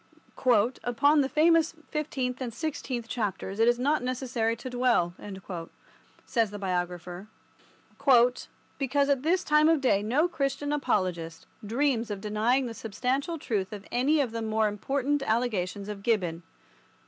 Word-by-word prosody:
"Upon 285 +5 +3
the 270 - 0
famous 325 +1 +3 0.2
fifteenth 270 -5 -2
and 245 -2 -3
sixteenth 255 -4 -4
chapters 200 -3 -3
it 225 - +4
is 240 0 +4
not 285 +4 +1
necessary 245 -3 -1
to 235 - -8
dwell," 245 -9 +1 1.1
says 230 -4 +1
the 205 - -7
biographer, 180 0 -3 1.5
"because 280 +1 +1
at 275 -2 +2
this 355 +5 +1
time 300 +1 +4
of 325 -2 +4
day 255 -7 +2
no 260 +11 +2
Christian 285 -2 -2
apologist 180 - -1 0.2
dreams 235 +1 0
of 205 -2 -4
denying 220 +6 +1
the 235 - -5
substantial 260 - -2
truth 205 -10 -2
of 205 -1 -8
any 280 +6 +2
of 255 -5 -1
the 230 0 -4
more 220 -1 +1
important 270 +7 -1
allegations 215 -6 -1
of 205 -1 -6
Gibbon. 185 -7 0
240 Hz, 140 wpm, -28 LUFS, 210-280 Hz, 1.5 s, it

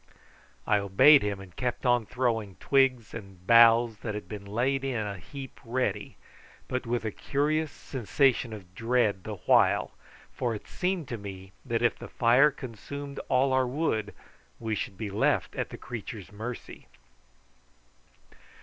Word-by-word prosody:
I 105 - +3
obeyed 100 +10 +6
him 100 -1 -2
and 95 -3 -12
kept 125 +1 -3
on 120 -3 +3
throwing 115 -6 -1
twigs 130 - +2
and 95 -5 -10
boughs 115 0 +6
that 110 -3 -4
had 105 - -6
been 105 -2 -7
laid 130 +6 0
in 135 -3 -1
a 105 -3 -3
heap 135 - -9
ready, 125 +2 -2 0.5
but 125 -1 -3
with 120 -1 -1
a 110 - -1
curious 150 +7 0
sensation 130 -1 0
of 95 -4 -10
dread 115 -3 +1
the 110 - -4
while, - - +4 0.4
for 120 -3 -1
it 105 - -9
seemed 180 -5 -2
to 120 - -4
me 95 -2 -9
that 120 -3 -1
if 120 - +2
the - - -9
fire 125 +5 +5
consumed 140 +2 -7
all 130 +1 +3
our 130 -1 +3
wood 125 -7 -1 0.4
we 110 - -2
should 100 -2 -4
be 105 -1 -4
left 105 +3 +1
at - - -2
the - - -8
creature's 110 -4 -7
mercy. 110 +4 -7
115 Hz, 155 wpm, -28 LUFS, 105-130 Hz, 0.5 s, obeyed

